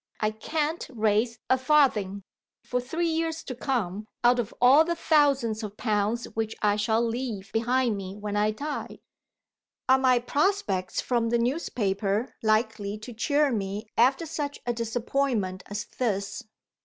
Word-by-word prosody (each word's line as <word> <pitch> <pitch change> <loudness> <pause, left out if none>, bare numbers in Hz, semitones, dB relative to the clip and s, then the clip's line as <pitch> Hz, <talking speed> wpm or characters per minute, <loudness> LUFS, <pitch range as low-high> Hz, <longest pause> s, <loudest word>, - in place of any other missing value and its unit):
I 215 0 +1
can't 305 +9 -2
raise 220 0 +1
a 260 - +3
farthing, 240 -9 +2 0.4
for 250 0 -1
three 325 +7 -1
years 325 0 -1
to 255 - -5
come, 215 -6 -2 0.2
out 245 +1 +5
of 230 -2 -2
all 265 +6 +7
the 340 +1 -1
thousands 275 -9 +2
of 210 -1 -7
pounds 215 +1 0
which 220 0 -2
I 205 -1 +4
shall 220 +2 +1
leave 230 -4 -4
behind 240 0 +1
me 190 0 -6
when 205 0 -4
I 210 +1 +3
die. 285 +8 -5 0.9
Are 260 0 +5
my 255 -1 +4
prospects 240 - 0
from 235 -2 0
the 235 - +2
newspaper 220 - -1
likely 215 -2 0
to 215 +3 -9
cheer 285 +5 +2
me 205 -1 -3
after 265 +7 +3
such 290 -2 -4
a 240 - 0
disappointment 230 -4 -1
as 205 +3 -4
this? 200 -3 -2
235 Hz, 150 wpm, -27 LUFS, 210-265 Hz, 0.9 s, all